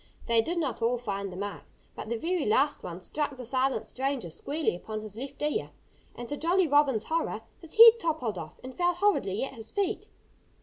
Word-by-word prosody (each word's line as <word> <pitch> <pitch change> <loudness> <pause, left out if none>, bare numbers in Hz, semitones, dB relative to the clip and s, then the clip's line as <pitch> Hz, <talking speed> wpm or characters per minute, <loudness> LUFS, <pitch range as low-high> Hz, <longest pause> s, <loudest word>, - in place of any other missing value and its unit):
They 230 -1 +4
did 345 +9 -3
not 290 -7 -2
all 240 +2 +2
find 200 -4 -4
the 180 - -8
mark. 200 +1 -5 0.3
But - - -7
the 235 - -1
very 340 +5 -1
last 275 +7 +2
one 175 +1 -7
struck 290 +6 -2
the 250 - -7
silent 260 +2 0
stranger 265 - -3
squarely 290 - -1
upon 215 +4 -6
his 215 -1 -6
left 270 +4 -7
ear. 300 +10 -1 0.5
And 240 - -7
to 290 - -3
Jolly 350 +3 +2
Robin's 280 -6 +3
horror, 315 -8 -1 0.2
his 330 -2 -6
head 460 0 +10
toppled 255 - -1
off 155 -2 -8
and 255 0 -8
fell 355 0 +2
horridly 345 - +1
at 270 - -4
his 225 -3 -8
feet. 405 0 -2
265 Hz, 205 wpm, -29 LUFS, 220-325 Hz, 0.5 s, head